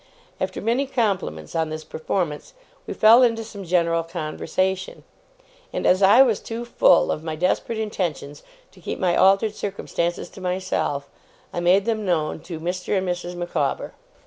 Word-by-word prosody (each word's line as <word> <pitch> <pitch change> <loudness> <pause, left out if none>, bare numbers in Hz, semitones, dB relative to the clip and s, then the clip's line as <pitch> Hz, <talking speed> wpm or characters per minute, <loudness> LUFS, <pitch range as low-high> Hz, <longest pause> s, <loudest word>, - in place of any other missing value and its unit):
After - - -3
many 240 +5 0
compliments 195 - -2
on 160 -1 0
this 155 0 -5
performance, 160 - -3 0.3
we - - -3
fell 225 +3 +7
into 230 -2 +2
some 205 -3 -9
general 170 -2 +1
conversation; 175 +3 -3 0.7
and - - -3
as 185 +2 +4
I 205 +7 +8
was 230 -6 +1
too 230 +1 -6
full 210 -6 +4
of 155 - -3
my 160 -1 -4
desperate 185 +7 0
intentions 175 -9 -3 0.3
to - - -19
keep - - -4
my 180 -3 +1
altered 195 +3 +4
circumstances 175 -4 -3
to 190 - -13
myself, 180 -6 -2 0.5
I - - -2
made 180 +3 +3
them 220 -2 -1
known 165 -6 0
to 165 -3 -5
Mr. 180 +4 -2
and 190 0 -1
Mrs. 175 0 -3
Micawber. 175 -5 -2
185 Hz, 160 wpm, -23 LUFS, 165-205 Hz, 0.7 s, I